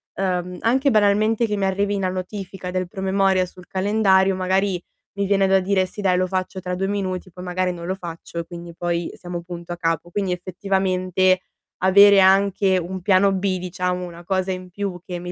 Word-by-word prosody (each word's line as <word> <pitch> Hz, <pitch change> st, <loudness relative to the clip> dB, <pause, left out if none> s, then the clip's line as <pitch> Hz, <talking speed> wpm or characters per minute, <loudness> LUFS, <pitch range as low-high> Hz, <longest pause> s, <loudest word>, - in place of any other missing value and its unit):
uhm, 180 Hz, -1 st, -2 dB
anche 265 Hz, +4 st, +2 dB
banalmente 215 Hz, +2 st, +3 dB
che 210 Hz, -2 st, -2 dB
mi 195 Hz, -, 0 dB
arrivi 200 Hz, +1 st, 0 dB
la 185 Hz, -, 0 dB
notifica 185 Hz, 0 st, -6 dB
del 185 Hz, -1 st, -2 dB
promemoria 190 Hz, -1 st, +1 dB
sul 180 Hz, 0 st, -15 dB
calendario, 195 Hz, -1 st, +3 dB
magari 185 Hz, 0 st, 0 dB, 0.3 s
mi 200 Hz, 0 st, -1 dB
viene 195 Hz, 0 st, +3 dB
da 190 Hz, 0 st, +4 dB
dire: 190 Hz, 0 st, +1 dB
"Sì 195 Hz, -, -9 dB
dai, 185 Hz, -3 st, +2 dB
lo 185 Hz, -, +2 dB
faccio 185 Hz, 0 st, -3 dB
tra 180 Hz, 0 st, -4 dB
2 190 Hz, +2 st, -1 dB
minuti", 185 Hz, -2 st, -3 dB
poi 180 Hz, +1 st, -9 dB
magari 180 Hz, 0 st, -1 dB
non 170 Hz, -1 st, -8 dB
lo 190 Hz, +1 st, -2 dB
faccio, 170 Hz, -2 st, -7 dB
e 170 Hz, -, -4 dB
quindi 170 Hz, -1 st, -9 dB
poi 170 Hz, 0 st, -2 dB
siamo 175 Hz, -1 st, -6 dB
punto 175 Hz, 0 st, -7 dB
a -, -, -8 dB
capo. 165 Hz, 0 st, -1 dB
Quindi 195 Hz, 0 st, -2 dB
effettivamente, 185 Hz, 0 st, 0 dB, 0.4 s
avere 200 Hz, +1 st, +7 dB
anche 190 Hz, 0 st, +4 dB
un 185 Hz, +1 st, -4 dB
piano 195 Hz, +1 st, +4 dB
B, 190 Hz, -1 st, -1 dB
diciamo, 180 Hz, 0 st, -2 dB
una 175 Hz, 0 st, -10 dB
cosa 190 Hz, +1 st, -1 dB
in 185 Hz, 0 st, -8 dB
più 190 Hz, -2 st, -4 dB
che 180 Hz, -2 st, -5 dB
mi 180 Hz, 0 st, -6 dB
185 Hz, 195 wpm, -22 LUFS, 180-195 Hz, 0.4 s, avere